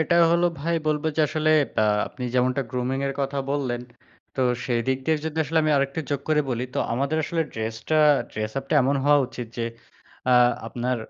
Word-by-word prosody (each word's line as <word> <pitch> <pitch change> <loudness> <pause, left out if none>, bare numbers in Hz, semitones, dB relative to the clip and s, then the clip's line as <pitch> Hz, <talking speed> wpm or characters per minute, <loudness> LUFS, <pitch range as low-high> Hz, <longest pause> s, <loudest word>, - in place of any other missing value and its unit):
এটা 160 +2 +1 0.2
হলো 170 +1 +3
ভাই 170 +3 0
বলবো 150 0 0
যে - - +2
আসলে 155 -1 +1 0.3
ব্যা 110 - +3 0.2
আপনি 125 - -7
যেমনটা 130 +2 +2
grooming 125 +2 -2
এর 135 - -1
কথা 140 0 -2
বললেন, 130 -4 -1 0.5
তো - - -2 0.2
সেইদিক 130 +2 0
দিয়ে 160 -1 +2
জন্য 160 0 -4
আসলে 160 +2 0
আমি 155 - +1
আরেকটা 140 +3 0
যোগ 140 - 0
করে 155 -1 +3
বলি। 120 0 -1
তো - - -1
আমাদের 140 +5 0
আসলে 165 -1 -1
ড্রেসটা 115 +7 -2 0.3
ড্রেস-আপটা 110 +7 -3
এমন 140 +2 +2
হওয়া 145 0 +5
উচিত 125 -1 -7
যে 115 - 0 0.7
আ - - +6 0.3
আপনার 125 +2 -2
135 Hz, 185 wpm, -24 LUFS, 125-155 Hz, 0.7 s, আ